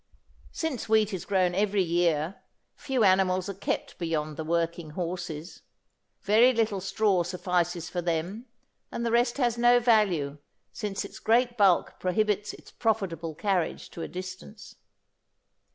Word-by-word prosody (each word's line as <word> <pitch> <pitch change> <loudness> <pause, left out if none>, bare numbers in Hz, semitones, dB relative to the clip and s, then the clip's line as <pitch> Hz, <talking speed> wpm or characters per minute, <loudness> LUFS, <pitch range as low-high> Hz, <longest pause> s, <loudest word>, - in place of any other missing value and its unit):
Since 300 -9 -3
wheat 215 -1 +3
is 185 - -4
grown 185 -3 +2
every 200 0 +1
year, 170 0 0 0.4
few 260 -4 -1
animals 185 -1 +3
are - - -3
kept 195 - -4
beyond 155 -3 -2
the 160 - -4
working 170 0 -1
horses. 175 -2 -5 0.6
Very 230 +5 +5
little 220 -4 0
straw 195 -1 +1
suffices 175 -1 -1
for 175 - -3
them 175 +8 -3 0.4
and 235 - -3
the 230 - 0
rest 240 +2 +2
has 240 -3 +1
no 240 0 +6
value 190 - +2 0.3
since 200 -1 -4
its - - -10
great 240 +2 +2
bulk 195 -6 +3
prohibits 210 +2 0
its - - -14
profitable 180 -8 -2
carriage 190 -3 -1
to 170 - -8
a - - -3
distance. 185 +4 -9
190 Hz, 140 wpm, -27 LUFS, 170-220 Hz, 0.6 s, no